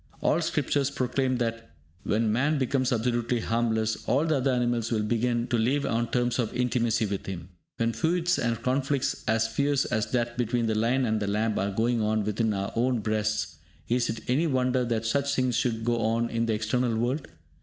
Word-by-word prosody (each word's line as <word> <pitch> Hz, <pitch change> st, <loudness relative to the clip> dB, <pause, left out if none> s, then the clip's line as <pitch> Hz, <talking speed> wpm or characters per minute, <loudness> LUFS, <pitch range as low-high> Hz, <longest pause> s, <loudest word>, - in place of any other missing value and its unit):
All -, -, +2 dB
scriptures 140 Hz, -1 st, 0 dB
proclaim 130 Hz, -1 st, 0 dB
that, 115 Hz, -1 st, -3 dB, 0.3 s
when 110 Hz, +1 st, +1 dB
man 140 Hz, +7 st, +2 dB
becomes 130 Hz, -1 st, 0 dB
absolutely 120 Hz, 0 st, 0 dB
harmless, 110 Hz, -1 st, 0 dB
all 140 Hz, +5 st, +2 dB
the 155 Hz, -3 st, +2 dB
other 135 Hz, +1 st, +1 dB
animals 120 Hz, -2 st, 0 dB
will 110 Hz, -2 st, +1 dB
begin 120 Hz, +2 st, 0 dB
to 120 Hz, -3 st, +1 dB
live 135 Hz, +5 st, +1 dB
on 115 Hz, -2 st, 0 dB
terms 120 Hz, 0 st, 0 dB
of 115 Hz, -3 st, 0 dB
intimacy 120 Hz, -2 st, +1 dB
with 100 Hz, -1 st, -4 dB
him. 90 Hz, -2 st, -6 dB, 0.3 s
When 115 Hz, 0 st, 0 dB
feuds 175 Hz, -, +1 dB
and 115 Hz, -1 st, 0 dB
conflicts 135 Hz, +1 st, 0 dB
as 110 Hz, 0 st, +2 dB
fierce 140 Hz, +4 st, +1 dB
as 110 Hz, -3 st, -1 dB
that 120 Hz, -1 st, -1 dB
between 120 Hz, 0 st, +1 dB
the 110 Hz, -, +1 dB
lion 120 Hz, +4 st, +1 dB
and 110 Hz, -1 st, 0 dB
the 105 Hz, -, -2 dB
lamb 105 Hz, +2 st, 0 dB
are 100 Hz, -, 0 dB
going 115 Hz, +3 st, 0 dB
on 110 Hz, 0 st, +1 dB
within 110 Hz, +2 st, 0 dB
our 100 Hz, -1 st, -2 dB
own 120 Hz, 0 st, +1 dB
breasts, 105 Hz, -6 st, -1 dB, 0.3 s
is 120 Hz, 0 st, +1 dB
it 115 Hz, 0 st, -5 dB
any 140 Hz, +7 st, +2 dB
wonder 130 Hz, -2 st, +1 dB
that 115 Hz, -1 st, -1 dB
such 140 Hz, +4 st, +1 dB
things 130 Hz, -2 st, +1 dB
should 115 Hz, -2 st, 0 dB
go 120 Hz, 0 st, +1 dB
on 115 Hz, +1 st, 0 dB
in 115 Hz, 0 st, 0 dB
the 115 Hz, -, +1 dB
external 115 Hz, +2 st, 0 dB
world? 125 Hz, +6 st, -1 dB
120 Hz, 195 wpm, -27 LUFS, 110-125 Hz, 0.3 s, All